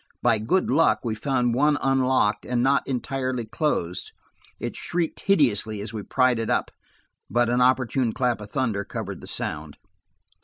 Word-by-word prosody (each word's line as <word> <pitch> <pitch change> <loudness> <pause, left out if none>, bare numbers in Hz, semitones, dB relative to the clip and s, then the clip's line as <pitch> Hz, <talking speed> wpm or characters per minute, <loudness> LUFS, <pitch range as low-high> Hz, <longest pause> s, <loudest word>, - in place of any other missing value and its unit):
By 115 -3 +3
good 180 - +1
luck, 160 +5 +3
we 115 -3 -1
found 125 0 0
one 145 +4 +3
unlocked 130 -6 +2
and 120 -1 0
not 140 +1 +3
entirely 130 -2 -2
closed; 110 - -2 0.5
it - - -4
shrieked 170 -2 -2
hideously 110 - +2
as 105 +2 -6
we 110 - -4
pried 130 +2 +2
it 115 - -2
up, - - 0 0.6
but 120 0 +2
an 125 +1 +2
opportune 130 -1 +2
clap 120 -2 0
of 105 - -9
thunder 115 -7 -1
covered - - -6
the - - -11
sound. 75 -1 -5
125 Hz, 160 wpm, -24 LUFS, 110-135 Hz, 0.6 s, By